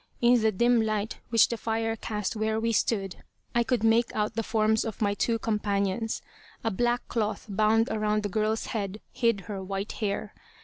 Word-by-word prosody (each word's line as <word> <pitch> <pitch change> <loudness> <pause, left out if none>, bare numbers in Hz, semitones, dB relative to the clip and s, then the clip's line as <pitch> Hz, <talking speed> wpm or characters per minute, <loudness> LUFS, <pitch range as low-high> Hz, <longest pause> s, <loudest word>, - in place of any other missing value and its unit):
In 240 0 +5
the 220 0 +3
dim 235 +3 +3
light 215 -1 -2
which 230 -2 +5
the 235 - -2
fire 225 0 -1
cast 210 -1 -3
where 220 0 0
we 230 +1 0
stood, 200 -3 0 0.4
I 235 - +3
could 235 -1 0
make 225 +1 +3
out 210 +1 0
the 225 - -1
forms 220 0 +2
of 220 -3 -5
my 205 -2 +2
two 230 +3 0
companions. 210 0 -1 0.4
A 225 - 0
black 240 +4 0
cloth 215 -3 -2
bound 215 +3 +3
around 215 -1 0
the - - 0
girl's 215 +3 0
head 205 -2 -3
hid 230 -5 +1
her 195 +1 -6
white 195 +2 -3
hair. 205 0 -3
220 Hz, 185 wpm, -28 LUFS, 210-225 Hz, 0.4 s, In